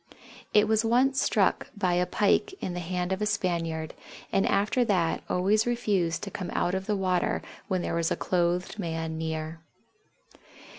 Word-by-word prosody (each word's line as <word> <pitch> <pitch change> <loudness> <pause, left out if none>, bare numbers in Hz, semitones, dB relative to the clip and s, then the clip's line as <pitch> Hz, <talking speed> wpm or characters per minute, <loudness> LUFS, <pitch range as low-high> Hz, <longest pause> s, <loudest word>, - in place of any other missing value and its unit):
It 210 0 +5
was 220 0 +3
once 255 +4 +3
struck - - +1
by 185 -3 +1
a 180 0 +2
pike 220 - +2
in 180 - -3
the 180 - -3
hand 180 +1 -2
of 190 +2 -1
a 210 - +1
Spaniard 165 -6 -1 0.4
and 195 - +2
after 210 +5 +2
that 180 -7 +1
always 205 +5 +2
refused 205 -8 0
to 200 - -5
come 180 -2 -5
out 175 - +1
of 190 0 -2
the 210 - +1
water 185 -2 0 0.2
when 185 -2 -1
there - - -2
was 165 -1 +1
a - - +1
clothed 180 +3 0
man 160 -3 -3
near. 160 0 -4
185 Hz, 170 wpm, -28 LUFS, 170-210 Hz, 0.4 s, It